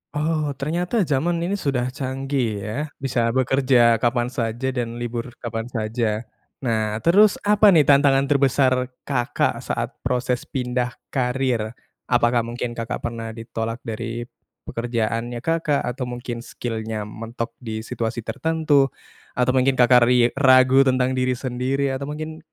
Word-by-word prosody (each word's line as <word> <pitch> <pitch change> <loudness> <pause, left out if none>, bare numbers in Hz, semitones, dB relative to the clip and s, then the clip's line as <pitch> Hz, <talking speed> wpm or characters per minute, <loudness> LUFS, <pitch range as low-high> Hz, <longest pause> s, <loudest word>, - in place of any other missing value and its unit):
Oh, 150 -1 0
ternyata 175 - 0
jaman 155 +3 0
ini 200 +4 -1
sudah 130 -5 -1
canggih, 135 0 -2 0.2
ya. 105 - -4 0.2
Bisa 125 -3 0
bekerja 130 -3 +4
kapan 120 +1 0
saja 120 +1 -2
dan 120 -2 -3
libur 120 0 -5
kapan 115 -1 -3
saja. 110 -1 -2 0.4
Nah, 110 -3 0
terus, 200 +4 +5
apa 210 +1 +5
nih, 155 - +6
tantangan 140 -1 +4
terbesar 135 -2 +2 0.2
Kakak 125 -4 0
saat - - -4
proses 125 0 -1
pindah 125 -1 -2 0.2
karier? 125 -3 -1 0.3
Apakah 120 -1 +3
mungkin 120 +1 -3
Kakak 115 0 -5
pernah 115 -1 -5
ditolak 115 0 -5
dari 115 0 -4 0.4
pekerjaannya 115 0 -2
Kakak, 165 -3 +1
atau 125 +1 -3
mungkin 120 -1 -5
skill-nya 110 -2 -4
mentok 115 +3 -6
di 110 -3 -5
situasi 115 0 -3
tertentu, 155 -1 +2 0.5
atau 125 0 +2
mungkin 130 +1 +2
Kakak 125 -1 +5
ri 125 -1 +4
ragu 130 0 +6
tentang 130 0 +2
diri 130 0 +1
sendiri, 130 +2 -1
atau 135 +1 -4
mungkin 155 +1 -6
125 Hz, 135 wpm, -22 LUFS, 115-135 Hz, 0.5 s, nih